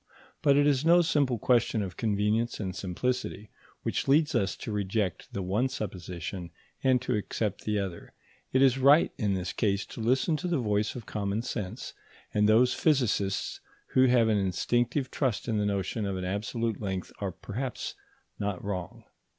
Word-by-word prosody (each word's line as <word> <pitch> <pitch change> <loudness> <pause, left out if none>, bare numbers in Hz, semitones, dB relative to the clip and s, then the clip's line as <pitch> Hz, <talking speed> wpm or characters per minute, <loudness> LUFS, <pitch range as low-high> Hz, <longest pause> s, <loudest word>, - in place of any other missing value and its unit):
But 140 -2 +4
it 145 - +5
is 145 -2 +3
no 170 +2 +6
simple 140 -6 +2
question 115 -1 +2
of 90 -3 -6
convenience 110 +3 0
and 95 -4 -3
simplicity 105 +2 -3 0.3
which - - -1
leads 150 +3 +4
us 95 0 +1
to 115 - -6
reject 100 -2 -2
the 100 - -3
one 105 +8 +1
supposition 90 -4 -5 0.3
and 130 -2 +4
to 125 - 0
accept 105 -1 -2
the 105 -1 0
other; 95 -4 -5 0.4
it 130 +1 +4
is 135 -1 +4
right 140 +5 +6
in 105 -4 +1
this 90 -2 -3
case 100 -2 0
to - - -10
listen 130 +8 +2
to 180 - -3
the 175 -2 +1
voice 105 -3 0
of 120 -4 -7
common 105 +1 -2
sense, 105 -7 -5 0.4
and 105 0 +3
those 125 +4 +5
physicists 115 -10 +1 0.3
who 130 0 +4
have 120 -2 +4
an 105 -2 +3
instinctive 120 +8 0
trust 125 -7 -1
in 110 -3 +1
the 105 - +1
notion 100 +2 -1
of 95 -1 -2
an 90 - -3
absolute 105 +4 -2
length 95 -3 -3
are 100 -2 -2
perhaps 120 +9 -5 0.5
not 100 -3 -2
wrong. 95 -4 -5
105 Hz, 175 wpm, -29 LUFS, 100-125 Hz, 0.5 s, no